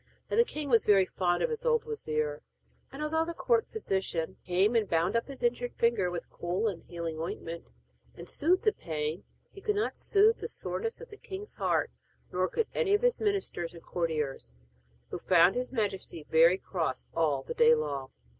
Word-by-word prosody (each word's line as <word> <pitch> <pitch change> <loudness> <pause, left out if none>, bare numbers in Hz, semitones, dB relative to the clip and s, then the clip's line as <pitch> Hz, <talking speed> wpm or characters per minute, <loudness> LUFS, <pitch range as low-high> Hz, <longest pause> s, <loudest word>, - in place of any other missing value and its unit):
Now - - +1
the 470 - +7
king 305 -10 -5
was 230 -4 +4
very 195 -2 +5
fond 175 -1 0
of - - 0
his 460 +1 -4
old 470 -2 +2
wazir, 155 - -2 0.5
and 275 +3 -5
although 320 +1 +1
the 335 +1 -5
court 460 +4 +2
physician 190 - -2
came 190 +6 +2
and 220 -4 +2
bound 170 +5 +1
up 230 - +1
his 270 -3 -9
injured 245 0 0
finger 230 -6 +2
with 175 -1 -5
cool 180 +6 -1
and 190 -6 -3
healing 170 -2 -5
ointment, 165 0 -5 0.5
and 170 - -10
soothed 355 +5 +2
the 430 - +3
pain, 155 - -4 0.3
he 395 - -12
could 420 +1 0
not 420 - 0
soothe 430 +3 +3
the - - -4
soreness 455 +1 -4
of 480 - -10
the 420 - -10
king's 405 +1 -8
heart, - - 0 0.4
nor 185 +1 +1
could 460 - 0
any 410 -5 +3
of 415 - 0
all - - +1
his - - +2
ministers 390 - -1
and 165 - -12
courtiers, 155 - -3 0.6
who - - -4
found 180 +1 +5
his 250 0 -3
majesty 195 - -3
very 165 +3 +5
cross 170 -8 -3
all 150 -5 +1
the - - -5
day 235 0 +6
long. 140 - -3
200 Hz, 195 wpm, -30 LUFS, -, 0.6 s, the